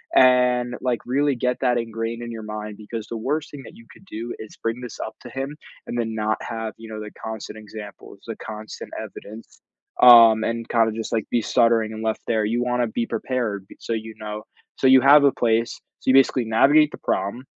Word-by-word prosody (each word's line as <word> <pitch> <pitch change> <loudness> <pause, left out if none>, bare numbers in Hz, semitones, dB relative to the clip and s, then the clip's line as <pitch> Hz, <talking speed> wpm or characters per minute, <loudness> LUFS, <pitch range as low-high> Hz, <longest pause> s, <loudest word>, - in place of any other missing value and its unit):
and, 125 -1 +4
like, 125 -2 -1
really 140 +3 +2
get 125 +1 -1
that 125 -2 +2
ingrained 115 0 -4
in 120 0 -6
your 110 -1 -7
mind 105 -1 -6
because 110 0 -7
the 115 - -5
worst 145 +7 -2
thing 140 -2 -10
that - - -12
you 115 - -16
could 190 - -18
do 120 - -6
is 110 - -10
bring 115 +1 -3
this 125 -2 -8
up 110 - -5
to - - -9
him 135 +3 -4 0.3
and 120 - -4
then 115 -2 -2
not 110 0 -1
have, 110 -1 -5
you 115 - -11
know, 110 -1 -7
the 105 0 -7
constant 110 -1 -6
examples, 105 -1 -11
the - - -4
constant 110 0 -9
evidence, 110 +2 -11 0.4
um, 115 -2 +9
and 115 0 -3
kinda 115 -1 +3
just, 110 0 -5
like, 110 -3 -1
be 120 - +2
stuttering 115 -1 +2
and 110 0 -6
left 110 0 -1
there, 110 -2 +1
you 120 +3 0
wanna 125 0 0
be 115 +1 -2
prepared 115 -7 -3
be - - -14
so, - - -7
you 110 0 -5
know 105 0 -6 0.3
so - - -2
you 130 0 +7
have 140 +3 +7
a 140 - +5
place, 115 -1 +1 0.3
so - - -3
you - - +6
basically 130 -2 +4
navigate 145 +7 +4
the - - -8
problem 100 +7 -2
115 Hz, 220 wpm, -23 LUFS, 110-125 Hz, 0.4 s, um